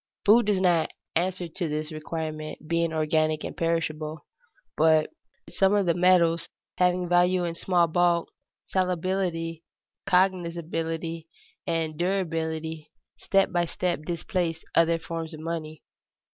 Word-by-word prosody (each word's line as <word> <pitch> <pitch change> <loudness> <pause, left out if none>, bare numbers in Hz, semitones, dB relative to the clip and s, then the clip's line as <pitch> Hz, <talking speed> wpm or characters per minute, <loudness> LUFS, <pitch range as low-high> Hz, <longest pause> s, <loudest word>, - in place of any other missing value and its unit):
Food 215 +1 +6
does 205 -3 +2
not 175 -4 +3 0.3
answer 180 +1 0
to 165 0 -3
this 155 +1 -3
requirement, 155 0 -5
being 170 0 +1
organic 155 0 +1
and - - -5
perishable. 155 -2 -2 0.5
But 155 0 +4 0.4
some 195 +1 +2
of 200 -2 +2
the 170 - +3
metals, 175 -2 +3 0.3
having 180 0 +2
value 180 +1 +3
in 170 -1 -2
small 175 0 +2
bulk, 170 0 +2 0.5
salability, 180 -2 -1 0.5
cognizability, 165 -3 0 0.4
and 165 -2 -1
durability, 160 -4 -2 0.3
step 195 -1 +2
by 175 -1 +1
step 175 -1 -2
displaced 170 0 -2
other 165 0 +4
forms 165 -1 -5
of - - -11
money. 160 -2 -5
165 Hz, 120 wpm, -26 LUFS, 160-180 Hz, 0.5 s, Food